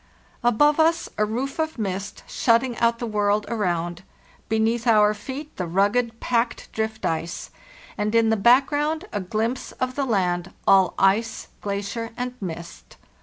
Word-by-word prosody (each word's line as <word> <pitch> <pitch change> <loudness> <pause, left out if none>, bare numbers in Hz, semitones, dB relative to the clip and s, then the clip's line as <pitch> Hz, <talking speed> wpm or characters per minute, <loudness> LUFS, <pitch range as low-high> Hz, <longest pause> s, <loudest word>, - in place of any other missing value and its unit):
Above 290 +6 +4
us 330 +1 +3
a - - +4
roof 255 +7 -3
of 315 -2 -1
mist 200 -1 -4
shutting 235 +1 +2
out 235 0 +3
the 240 - -4
world 210 -1 +1
around, 175 -5 -1 0.5
beneath 225 +2 +1
our 210 -2 +5
feet 265 +8 -8
the 180 - -2
rugged, 225 +6 +1
packed 240 0 -1
drift 220 0 -3
ice, 165 +1 -3 0.5
and 210 +2 0
in 225 -1 +4
the - - +4
background 290 - +3
a - - -1
glimpse 225 +7 -2
of 255 0 -2
the 280 - -1
land, 180 -6 0
all 190 -2 +5
ice, 215 +4 +1
glacier, 205 +3 -3
and 250 0 -3
mist. 170 -2 -8
220 Hz, 150 wpm, -24 LUFS, 200-245 Hz, 0.5 s, our